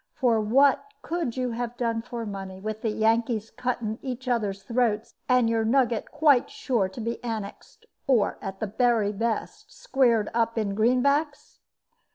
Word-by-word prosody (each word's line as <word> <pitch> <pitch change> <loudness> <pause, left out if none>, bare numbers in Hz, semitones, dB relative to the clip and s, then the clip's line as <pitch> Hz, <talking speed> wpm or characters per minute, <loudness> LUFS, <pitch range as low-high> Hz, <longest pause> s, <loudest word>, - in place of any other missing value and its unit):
For 235 -6 +2
what 265 +6 +4 0.2
could 325 -8 -3
you 250 -1 -1
have 240 +1 -4
done 230 -2 -1
for 235 -1 -6
money, 195 -2 -6
with 215 +2 -5
the 225 - 0
Yankees 225 0 +1
cutting 235 -3 -3
each 255 -1 -6
other's 205 -5 -1
throats, 230 -1 0 0.2
and 250 -2 +4
your 225 -1 +1
nugget 235 -1 +1
quite 295 -4 +3
sure 225 -7 -1
to 190 - -10
be 230 +2 -4
annexed, 220 -4 -6 0.2
or, 235 -7 +2
at 195 -1 -6
the - - -1
very 220 -1 +2
best, 225 - -3
squared 245 - +1
up 230 0 0
in 205 -3 0
greenbacks?" 280 +7 +1
230 Hz, 160 wpm, -26 LUFS, 215-250 Hz, 0.2 s, what